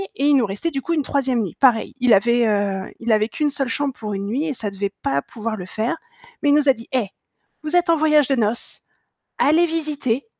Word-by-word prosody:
et 275 - -1
il 290 0 +5
nous 250 -4 +3
restait 205 +12 -3
du 275 -2 -3
coup 335 - -2
une 305 -4 +1
3e 265 -3 0
nuit, 195 -6 -4
pareil. 250 -2 +3
Il 250 -2 +4
avait, 235 +4 +3
heu, 200 -2 -1
il 230 0 -1
avait 215 +1 +2
qu'1 300 -1 0
seule 275 -2 -2
chambre 275 +3 -1
pour 210 -2 -5
1 200 0 -4
nuit 250 +8 -1
et 295 - -2
ça 220 -4 -4
devait 200 0 -4
pas 140 0 0
pouvoir 225 0 -5
le 180 -4 -7
faire, 220 - -2 0.5
mais 290 - +3
il 285 - +5
nous 295 -1 +3
a 270 - +7
dit: 230 -1 -13
«Eh, 250 -6 0 0.6
vous 310 +3 -2
êtes 350 0 +3
en 335 - +5
voyage 305 -2 +4
de 275 - +2
noces, 230 -1 -2 0.5
allez 320 +4 +4
visiter, 295 -6 -2
250 Hz, 240 wpm, -21 LUFS, 215-290 Hz, 0.6 s, a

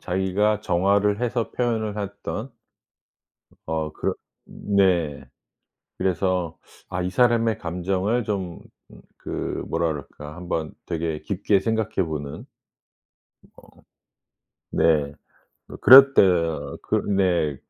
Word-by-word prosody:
자기가 95 +3 0
정화를 100 +4 +1
해서 120 -1 -1
표현을 110 -4 -2
했던 105 +4 -5 1.2
어 80 -1 -2
그렇 - - -2 0.3
네. 90 -8 0 0.7
그래서 90 -2 -1 0.3
아 90 0 -3
이 90 - -2
사람의 115 -1 +2
감정을 95 +7 -1
좀 95 -5 -4 0.6
그 - - -4
뭐라 85 0 0
그럴까. 75 0 -7
한번 85 -3 -4
되게 80 -2 -3
깊게 100 0 0
생각해 110 -3 -1
보는. 75 -3 -6 1.1
어. - - -15 1.1
네. 75 -3 +2 0.5
그 - - -11
그랬데어 95 - +6
그 - - 0
네. 90 -7 +1
95 Hz, 185 characters per minute, -23 LUFS, 85-105 Hz, 1.2 s, 그랬데어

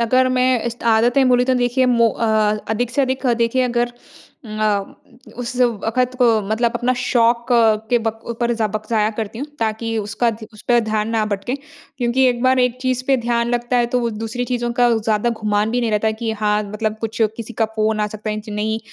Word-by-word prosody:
अगर 255 +2 +3
मैं 255 -2 +2
इस 235 - -2
त - - -10
आदतें 245 +4 +3
बोलूँ, 250 0 +4
तो 260 - +2
देखिए 250 +1 +1
मो 235 -2 +4
अ, 230 - -3 0.4
अधिक 230 +2 -1
से 275 +3 +1
अधिक 260 0 -1
देखिए 235 +2 +2
अगर 240 0 0 0.5
अ, 215 -2 -1 0.4
उस 245 0 -4
वक़्त 245 +2 +1
को 245 -2 +5 0.2
मतलब 230 +2 +1
अपना 250 +1 +1
शौक 235 -1 +2 0.4
के 240 - +4
बक 225 0 -2
ऊपर 235 +1 -1
ज़ 230 -1 -2
वक़्त 215 0 -3
ज़ाया 215 -1 +2
करती 220 0 -4
हूँ। 280 - -4
ताकि 225 0 -2
उसका 215 +3 0
ध 220 0 -9
उस 210 - -14
पे 240 -1 +5
ध्यान 215 -1 -1
ना 225 -1 0
भटके 205 +5 -3 0.4
क्योंकि 245 +2 +2
एक 240 0 -1
बार 260 0 +3
एक 250 -1 +2
चीज़ 255 -1 -1
पे 270 - +4
ध्यान 235 -1 0
लगता 240 +1 0
है, 240 -1 +3
तो 250 +1 0
वो 235 -1 -1
दूसरी 225 +3 -4
चीज़ों 240 -1 -2
का 245 - +6
ज़्यादा 220 +1 0
गुमान 210 0 +1
भी 245 +1 0
नहीं 230 -2 0
रहता 210 +1 0
है, 220 - +2
कि 225 0 -3
हाँ, 210 0 0
मतलब 215 0 -2
कुछ 225 0 -5 0.2
किसी 230 0 -7
का 225 +1 +1
फ़ोन 215 0 +1
आ 210 - +1
सकता 215 +1 -5
है, 210 - -2
इंच 215 +1 -8
नहीं, 215 +1 -2
235 Hz, 220 wpm, -19 LUFS, 215-245 Hz, 0.5 s, का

